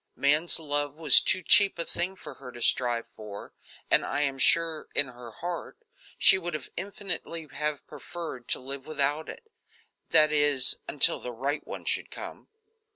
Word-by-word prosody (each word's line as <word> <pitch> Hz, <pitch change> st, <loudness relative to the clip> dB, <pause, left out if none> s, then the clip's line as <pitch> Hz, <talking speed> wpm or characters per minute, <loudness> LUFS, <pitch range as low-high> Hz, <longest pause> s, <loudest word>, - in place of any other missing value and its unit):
Man's 150 Hz, +5 st, +3 dB
love 145 Hz, -2 st, -3 dB
was 160 Hz, -1 st, +6 dB
too 185 Hz, -1 st, 0 dB
cheap 200 Hz, -2 st, +5 dB
a 170 Hz, -, -3 dB
thing 180 Hz, +2 st, -3 dB
for -, -, -11 dB
her 130 Hz, -2 st, -12 dB
to 120 Hz, -, -11 dB
strive 120 Hz, -2 st, 0 dB
for, 105 Hz, -2 st, -11 dB, 0.4 s
and -, -, +5 dB
I 145 Hz, -, -3 dB
am 135 Hz, -2 st, -2 dB
sure, 165 Hz, +3 st, +2 dB
in 140 Hz, -, +4 dB
her 120 Hz, -1 st, -12 dB
heart, 170 Hz, +9 st, -7 dB, 0.4 s
she 190 Hz, -, +6 dB
would 170 Hz, -3 st, -5 dB, 0.2 s
infinitely 175 Hz, -4 st, -6 dB
have 150 Hz, +1 st, -4 dB
preferred 160 Hz, -8 st, -9 dB
to -, -, +1 dB
live 135 Hz, +2 st, -8 dB
without 150 Hz, 0 st, -2 dB
it 470 Hz, -, -11 dB, 0.6 s
that 155 Hz, 0 st, +5 dB
is, 145 Hz, -3 st, +4 dB
until 145 Hz, -, +3 dB
the 125 Hz, -, -7 dB
right 135 Hz, +5 st, -4 dB
one -, -, -8 dB
should -, -, -2 dB
come. -, -, -10 dB
150 Hz, 165 wpm, -26 LUFS, 135-170 Hz, 0.6 s, was